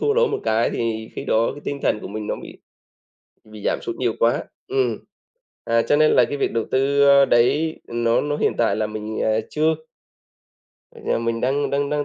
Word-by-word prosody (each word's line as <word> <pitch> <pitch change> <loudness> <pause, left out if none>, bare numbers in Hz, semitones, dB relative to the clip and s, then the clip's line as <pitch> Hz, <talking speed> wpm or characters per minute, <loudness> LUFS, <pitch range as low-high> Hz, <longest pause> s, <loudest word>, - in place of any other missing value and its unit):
thua 435 0 +2
lỗ 480 0 +4
một - - -2
cái 110 +1 +1
thì 110 -1 -3
khi - - -5
đó 115 +1 +2
cái 145 - -11
tinh 140 -1 -4
thần 105 - +1
của - - -7
mình 105 +1 -5
nó - - -1
bị - - -11 0.9
bị 110 -1 -13
giảm - - +1
sút 115 - -5
nhiều 120 -3 -1
quá. 115 +1 +2 0.2
Ừm, 400 0 0 0.7
à, 115 0 +2
cho 145 - +2
nên 155 0 +4
là - - +5
cái 145 - -4
việc - - 0
đầu 115 -1 -1
tư, 140 +2 +3
a, 140 0 +7
đấy 145 +7 +2
nó 115 0 +1
nó 145 0 -2
hiện - - +1
tại 115 - +2
là 110 -1 -1
mình, 110 0 -5
à, 110 0 +2
chưa. 155 +1 +1 1.3
Giờ - - 0
mình 115 0 -2
đang 135 +4 0
đang 140 0 -1
đang, 150 -1 0
120 Hz, 215 wpm, -22 LUFS, 110-145 Hz, 1.3 s, a